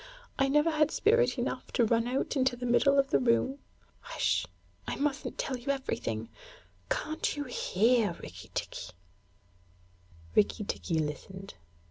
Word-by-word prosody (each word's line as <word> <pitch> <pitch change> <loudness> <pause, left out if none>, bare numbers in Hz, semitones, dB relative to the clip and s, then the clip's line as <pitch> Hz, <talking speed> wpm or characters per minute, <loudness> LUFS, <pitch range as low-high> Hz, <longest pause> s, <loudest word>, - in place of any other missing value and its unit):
'I 270 - +4
never 295 +4 +3
had 305 -1 +3
spirit 475 +7 +3
enough - - -3
to 240 - +4
run 230 +1 +2
out 260 +4 -1
into 260 -2 +2
the 245 +1 -5
middle 275 +3 +4
of 275 0 +3
the - - +4
room. 255 +3 +2 0.6
H'sh! - - +1 0.4
I - - -2
mustn't 285 0 -2
tell 270 - -2
you 245 +3 -2
anything. 115 - -3 0.6
Can't 310 -1 -1
you 290 - -1
hear, 230 -4 +2
Rikki - - -11
tikki?' 90 +1 -4 1.4
Rikki 210 0 +3
tikki 170 -4 -2
listened. 175 +6 -4
255 Hz, 140 wpm, -30 LUFS, 210-280 Hz, 1.4 s, I